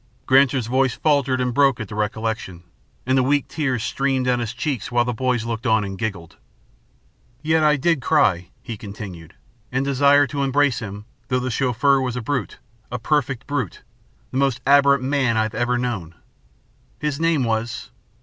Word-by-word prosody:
Granser's 130 Hz, -2 st, +4 dB
voice 130 Hz, +1 st, +1 dB
faltered 140 Hz, -4 st, +1 dB
and 125 Hz, -1 st, 0 dB
broke 135 Hz, -2 st, +3 dB
at 110 Hz, -, -5 dB
the 105 Hz, -, -9 dB
recollection, 105 Hz, -4 st, -3 dB, 0.4 s
and 130 Hz, +1 st, +2 dB
the 130 Hz, -, +4 dB
weak 140 Hz, +2 st, +1 dB
tears 130 Hz, -8 st, -2 dB
streamed 135 Hz, +1 st, 0 dB
down 125 Hz, -1 st, +1 dB
his 115 Hz, -2 st, -3 dB
cheeks 130 Hz, 0 st, -3 dB
while 120 Hz, 0 st, +2 dB
the 125 Hz, -, -1 dB
boys 125 Hz, -1 st, -1 dB
looked 115 Hz, +2 st, -3 dB
on 110 Hz, -2 st, +3 dB
and 95 Hz, -1 st, -5 dB
giggled. 95 Hz, -5 st, -5 dB, 1.1 s
"Yet 160 Hz, +1 st, +2 dB, 0.2 s
did 170 Hz, +1 st, +3 dB
I -, -, -12 dB
cry," 100 Hz, -, +2 dB
he 115 Hz, -, -6 dB
continued, 100 Hz, -5 st, -9 dB, 0.4 s
"and 130 Hz, +2 st, 0 dB
desire 140 Hz, +1 st, +4 dB
to 140 Hz, +1 st, -4 dB
embrace 140 Hz, -2 st, +2 dB
him, 105 Hz, -2 st, -7 dB, 0.2 s
though 125 Hz, +1 st, +1 dB
the 125 Hz, 0 st, -3 dB
Chauffeur 135 Hz, +3 st, +2 dB
was 125 Hz, -2 st, -2 dB
a 125 Hz, -, -3 dB
brute, 125 Hz, -2 st, -3 dB, 0.3 s
a 125 Hz, -, -2 dB
perfect 135 Hz, 0 st, -1 dB
brute 130 Hz, -, -3 dB, 0.5 s
the 130 Hz, -, -3 dB
most 135 Hz, -3 st, +1 dB
abhorrent 140 Hz, -1 st, +5 dB
man 130 Hz, -4 st, +1 dB
I 110 Hz, -, +3 dB
have 110 Hz, 0 st, -4 dB
ever 120 Hz, +2 st, 0 dB
known. 105 Hz, -10 st, -3 dB, 0.8 s
His 150 Hz, -1 st, -2 dB
name 165 Hz, -4 st, +2 dB
was... 120 Hz, +2 st, -2 dB
125 Hz, 180 wpm, -22 LUFS, 110-140 Hz, 1.1 s, abhorrent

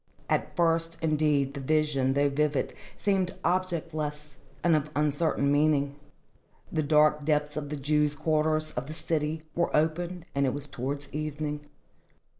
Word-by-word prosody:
At -, -, 0 dB
first, 165 Hz, -1 st, +1 dB
indeed, 150 Hz, -3 st, +1 dB
the 140 Hz, -, -5 dB
vision, 140 Hz, -2 st, +1 dB
though 145 Hz, +1 st, +3 dB
vivid, 145 Hz, 0 st, 0 dB, 0.2 s
seemed 190 Hz, -3 st, 0 dB
objectless 155 Hz, -5 st, -2 dB, 0.3 s
and 170 Hz, -2 st, +5 dB
of 150 Hz, 0 st, 0 dB
uncertain 150 Hz, -1 st, +1 dB
meaning. 145 Hz, -1 st, +2 dB, 0.8 s
The 155 Hz, -, +1 dB
dark 150 Hz, 0 st, +4 dB
depths 150 Hz, 0 st, +1 dB
of 150 Hz, -2 st, -4 dB
the 150 Hz, -, -3 dB
Jews' 150 Hz, +1 st, +1 dB
quarter 155 Hz, 0 st, +2 dB
of 155 Hz, -4 st, -2 dB
the 155 Hz, -, -6 dB
city 155 Hz, -1 st, -1 dB
were 170 Hz, -, +1 dB
opened, 170 Hz, +3 st, -1 dB
and 140 Hz, 0 st, +2 dB
it 130 Hz, -, 0 dB
was 145 Hz, 0 st, -5 dB
towards 140 Hz, +1 st, -5 dB
evening. 150 Hz, 0 st, -3 dB
150 Hz, 145 wpm, -28 LUFS, 145-155 Hz, 0.8 s, and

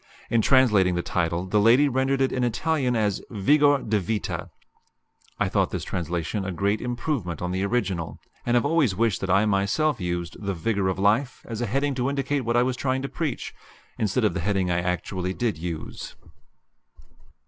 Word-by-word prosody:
In 115 Hz, -, +4 dB
translating 105 Hz, -9 st, +4 dB
the 85 Hz, -, -1 dB
title 85 Hz, +1 st, -1 dB
the 105 Hz, +3 st, +1 dB
lady 120 Hz, +7 st, +5 dB
rendered 135 Hz, +1 st, +1 dB
it 135 Hz, -, +2 dB
in 125 Hz, -, -1 dB
Italian 125 Hz, +1 st, 0 dB
as 105 Hz, -3 st, 0 dB
Vigor 145 Hz, +6 st, +3 dB
di 105 Hz, -1 st, +2 dB
Vita. 105 Hz, +3 st, -3 dB, 0.9 s
I -, -, +2 dB
thought -, -, +1 dB
this -, -, -4 dB
translation 90 Hz, +3 st, -3 dB
a 95 Hz, -, -3 dB
great 100 Hz, +4 st, 0 dB
improvement 120 Hz, -, -3 dB
on 90 Hz, 0 st, -3 dB
the 95 Hz, +1 st, -1 dB
original, 100 Hz, -7 st, -1 dB, 0.3 s
and 120 Hz, -, +1 dB
have 120 Hz, -, +3 dB
always 145 Hz, -, +2 dB
wished 110 Hz, -2 st, +1 dB
that 95 Hz, -, -3 dB
I 95 Hz, +2 st, +4 dB
had 110 Hz, -, +1 dB
myself 100 Hz, +8 st, +1 dB
used 85 Hz, 0 st, -3 dB
"The 100 Hz, -1 st, -2 dB
Vigor 100 Hz, +3 st, 0 dB
of 95 Hz, -, -1 dB
Life" 110 Hz, +7 st, +1 dB
as 115 Hz, 0 st, -5 dB
a 120 Hz, -, -1 dB
heading 140 Hz, +6 st, 0 dB
to 130 Hz, 0 st, -1 dB
indicate 140 Hz, 0 st, -1 dB
what 120 Hz, 0 st, 0 dB
I 120 Hz, -, +5 dB
was 125 Hz, 0 st, -1 dB
trying 130 Hz, 0 st, -1 dB
to 140 Hz, -, -3 dB
preach, 155 Hz, -7 st, -3 dB, 0.5 s
instead 110 Hz, +3 st, +1 dB
of 105 Hz, -, +2 dB
the 95 Hz, -, -2 dB
heading 95 Hz, 0 st, 0 dB
I 85 Hz, -, +1 dB
actually 90 Hz, +1 st, -2 dB
did 115 Hz, -9 st, -1 dB
use. 85 Hz, -2 st, -6 dB
110 Hz, 190 wpm, -25 LUFS, 95-130 Hz, 0.9 s, lady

